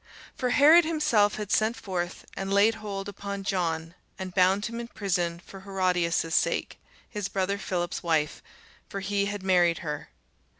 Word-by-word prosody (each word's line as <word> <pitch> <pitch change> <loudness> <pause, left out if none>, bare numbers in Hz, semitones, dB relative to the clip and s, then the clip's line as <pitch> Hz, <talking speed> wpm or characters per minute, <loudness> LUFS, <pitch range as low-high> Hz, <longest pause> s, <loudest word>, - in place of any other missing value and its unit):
For 250 - -1
Herod 300 +6 +7
himself 300 -11 +2
had 210 -2 -5
sent 220 +2 +2
forth 180 -5 -4
and 195 0 -4
laid 200 +3 +5
hold 200 -2 -5
upon 200 0 -5
John, 165 -4 -1 0.2
and 185 -1 -6
bound 190 +2 +3
him 235 0 -4
in 235 - -5
prison 175 -6 -1
for 195 - -11
Herodias' 180 -4 0
sake, - - 0 0.3
his 210 -3 -4
brother 200 +1 -1
Philip's 175 -3 -2
wife: 160 -3 0 0.5
for 195 - -5
he 200 0 0
had 205 -1 -4
married 175 -3 +3
her. 150 -1 -4
195 Hz, 160 wpm, -27 LUFS, 175-205 Hz, 0.5 s, Herod